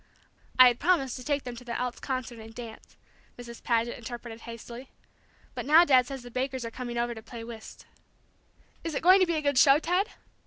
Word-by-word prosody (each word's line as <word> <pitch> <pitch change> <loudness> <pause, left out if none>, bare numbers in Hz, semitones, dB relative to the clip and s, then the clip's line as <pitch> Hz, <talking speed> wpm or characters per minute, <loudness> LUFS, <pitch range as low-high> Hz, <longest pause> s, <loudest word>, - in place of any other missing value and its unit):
"I 255 0 +10
had 240 - -3
promised 295 -6 +1
to 250 - -9
take 285 +1 -1
them 245 -1 -7
to 250 - -10
the 235 -1 -4
Elks 250 -1 -3
Concert 255 -3 -4
and 225 0 -12
dance," 230 -2 -10 0.4
Mrs. 235 -1 -10
Paget 235 0 0
interpreted 235 -1 -8
hastily. 235 +2 -10 0.6
"But - - -6
now 320 +4 +7
Dad 255 -5 +4
says 270 -2 -7
the 245 - -11
Bakers 260 0 -3
are 230 - -5
coming 240 -1 -6
over 235 0 -1
to 220 - -10
play 230 +1 -9
whist." 230 -1 -10 1.0
"Is 330 -3 -4
it - - -3
going 370 +3 +7
to 370 - +3
be 340 - 0
a 305 - -2
good 285 -3 +2
show, 275 +1 +7
Ted?" 360 +6 0
250 Hz, 210 wpm, -28 LUFS, 235-280 Hz, 1.0 s, I